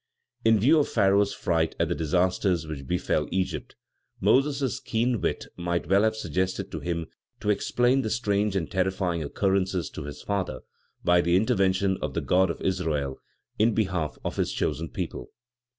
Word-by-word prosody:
In 115 -1 +5
view 145 +9 +5
of 145 - +1
Pharaoh's 100 -1 +3
fright 80 -3 0
at - - +2
the - - 0
disasters 90 +1 +1
which 70 -4 -7
befell 90 -4 0
Egypt, 95 0 -2 0.4
Moses' 135 -2 +2
keen 120 -3 0
wit - - -1
might 85 -2 -2
well 95 +3 +4
have 110 0 +2
suggested 95 -2 -2
to - - -4
him 85 -1 -3 0.3
to 105 - +1
explain 125 +5 +2
the 110 - -2
strange 105 -3 0
and 90 -4 -2
terrifying 95 -3 0
occurrences, 95 +3 0
to - - -7
his 75 0 -8
father, 100 -2 -2 0.4
by 90 0 +4
the 85 0 +2
intervention 95 -3 +2
of 75 -3 -3
the - - 0
God 95 0 +3
of 85 - -4
Israel 80 -8 -1 0.4
in 110 +1 +3
behalf 90 -8 -1
of - - -3
his - - 0
chosen 80 0 -2
people. - - -5
95 Hz, 165 wpm, -26 LUFS, 85-105 Hz, 0.4 s, In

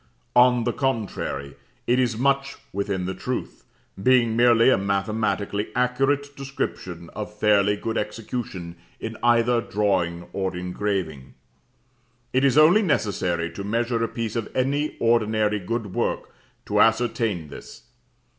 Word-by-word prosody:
On 125 -1 +5
the 120 0 0
contrary, 100 - -3 0.3
it 125 +1 +2
is 120 -4 +1
much 140 +2 +1 0.2
within 100 -2 -2
the 95 - -2
truth, - - -5 0.4
being 120 -1 +4
merely 120 +1 +5
a - - +4
mathematically 100 +1 -1
accurate 135 +3 0
description 90 -11 -5
of 105 0 -7
fairly 105 -1 +3
good 115 +2 -2
execution 105 -5 -5 0.2
in 110 0 -5
either 120 0 +3
drawing 95 -6 -1
or 95 -2 -2
engraving. 90 -7 -3 1.0
It 130 +1 +2
is 140 0 +3
only 165 +8 +7
necessary 90 - 0
to 100 +3 -7
measure 115 +2 0
a - - +1
piece 115 -1 -4
of 115 -2 -2
any 140 +4 0
ordinary 110 -2 +2
good 105 +1 -4
work - - -2 0.3
to - - 0
ascertain 115 - +1
this. - - -11
110 Hz, 130 wpm, -24 LUFS, 100-125 Hz, 1.0 s, only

